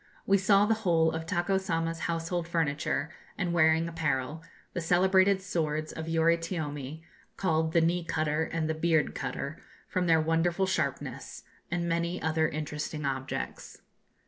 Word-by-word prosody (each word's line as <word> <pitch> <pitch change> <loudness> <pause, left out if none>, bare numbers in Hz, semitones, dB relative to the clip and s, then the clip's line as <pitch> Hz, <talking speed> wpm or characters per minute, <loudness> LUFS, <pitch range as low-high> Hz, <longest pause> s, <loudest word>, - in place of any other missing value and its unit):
We 200 0 +4
saw 200 +1 +5
the 225 - +3
whole 165 -5 +3
of 160 0 -5
Tako 190 +1 +1
Sama's 165 -3 -2
household 165 +1 -2
furniture 160 -1 -1 0.3
and 180 -4 -1
wearing 160 0 +4
apparel, 155 -2 -2 0.3
the 175 - -2
celebrated 190 +3 +4
swords 155 -4 -1
of 160 0 -6
Yoritiome, 160 -3 -1 0.3
called 160 -3 +1
the 170 - +5
'knee 170 +2 +1
cutter' 155 -1 0
and 160 -1 -2
the 160 - 0
'beard 160 -1 +1
cutter,' 140 +3 -4 0.3
from 180 -1 -1
their 165 -1 +5
wonderful 165 +4 +1
sharpness, 140 -7 -3 0.3
and 175 0 -1
many 170 +1 -1
other 160 0 +1
interesting 150 0 -4
objects. 130 - -4
165 Hz, 145 wpm, -29 LUFS, 155-175 Hz, 0.3 s, saw